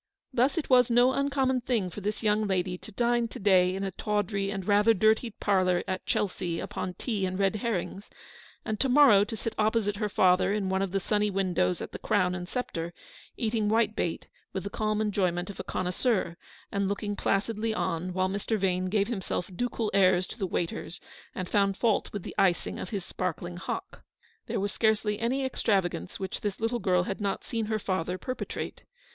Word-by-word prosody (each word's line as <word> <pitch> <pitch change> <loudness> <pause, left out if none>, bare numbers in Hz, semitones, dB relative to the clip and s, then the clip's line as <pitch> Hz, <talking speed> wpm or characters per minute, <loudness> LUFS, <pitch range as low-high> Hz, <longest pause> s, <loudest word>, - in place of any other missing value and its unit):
Thus 255 +7 +2
it 330 - -1
was 250 -2 +5
no 245 +2 +5
uncommon 270 -2 +1
thing 230 -8 0
for 205 - -7
this 210 +3 -3
young 210 0 +2
lady 185 -1 0
to 200 - -11
dine 235 +2 +1
to - - -9
day 185 -2 +4
in 195 - -3
a 195 - -2
tawdry 205 0 -1
and 195 -2 -4
rather 210 +2 +5
dirty 220 +4 +3
parlour 185 -4 +1
at 185 -1 -3
Chelsea 180 -4 -1
upon 180 -1 -4
tea 215 -6 -2
and 185 0 -3
red 195 +2 +2
herrings, 200 -2 -3 0.6
and 215 -1 -2
to 270 - +2
morrow 250 -7 +7
to 220 +2 -5
sit 225 +1 -3
opposite 215 -1 +1
her 210 -1 -1
father 185 0 +4
in 205 -2 -1
one 190 0 +1
of 195 -2 -1
the 195 - +1
sunny 210 +2 +1
windows 185 -2 0
at - - -7
the - - -7
Crown 185 -4 +1
and 180 0 -5
Sceptre, 170 -9 -4 0.4
eating 220 -2 0
white 220 0 +2
bait 170 - -2 0.3
with 190 - -3
the 200 - -5
calm 215 0 0
enjoyment 185 -3 0
of - - -14
a - - -3
con 185 - -3
noisseur, 180 -2 0 0.4
and 200 -1 0
looking 205 +1 -2
placidly 215 +3 0
on 185 -4 -2
while 185 +1 +1
Mr. 205 +3 -1
Vane 185 -2 0
gave 200 0 +2
himself 190 -5 -3
ducal 230 0 -1
airs 185 -2 +4
to 220 - -10
the 195 - 0
waiters, 170 0 -3 0.4
and 185 - -3
found 200 0 +2
fault 225 -4 +1
with 205 -3 -5
the - - -7
icing 180 -3 +2
of - - -5
his 195 -4 -4
sparkling 175 -1 -4
hock. 375 - -5 0.5
There - - -1
was 200 +1 -1
scarcely 215 -1 +1
any 260 +4 0
extravagance 190 - -1
which 190 - -4
this 205 -2 -3
little 230 +2 0
girl 180 -3 +2
had 195 +3 -4
not 200 -1 -1
seen 225 -3 -3
her 220 0 0
father 185 -3 -2
perpetrate. 255 +6 -5
200 Hz, 200 wpm, -28 LUFS, 185-220 Hz, 0.6 s, morrow